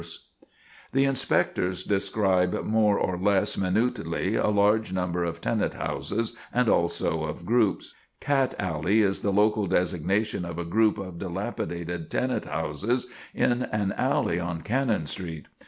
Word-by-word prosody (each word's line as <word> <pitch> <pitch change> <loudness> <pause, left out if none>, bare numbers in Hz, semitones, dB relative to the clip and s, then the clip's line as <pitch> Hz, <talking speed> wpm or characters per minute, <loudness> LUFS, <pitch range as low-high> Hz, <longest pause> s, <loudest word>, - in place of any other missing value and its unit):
[Sidenote: 85 0 -9
Cat - - -31
Alley] - - -40 0.5
The 140 - +3
inspectors 95 -8 0
describe 95 -2 +1
more 105 -2 +3
or 90 -1 -1
less 100 0 +2
minutely 95 -2 0
a - - +2
large 105 0 +3
number 90 -2 -1
of 85 -1 -4
tenant - - 0
houses, 115 +3 -2 0.2
and 125 -1 +2
also 85 -3 +1
of 80 +2 -6
groups: 115 0 +1 0.3
"'Cat 135 -2 +1
Alley' 90 +4 +1
is 95 -1 +1
the 100 - 0
local 105 +1 +2
designation 90 +3 0
of 85 -1 -6
a 85 - -3
group 110 +5 +2
of 95 -4 -7
dilapidated 85 -3 -4
tenant 130 0 -1
houses 115 - -1 0.3
in 120 0 +2
an 105 -5 -1
alley 85 - +1
on 85 -1 -3
Cannon 115 - 0
Street. 80 -1 -5
95 Hz, 150 wpm, -26 LUFS, 85-110 Hz, 0.5 s, The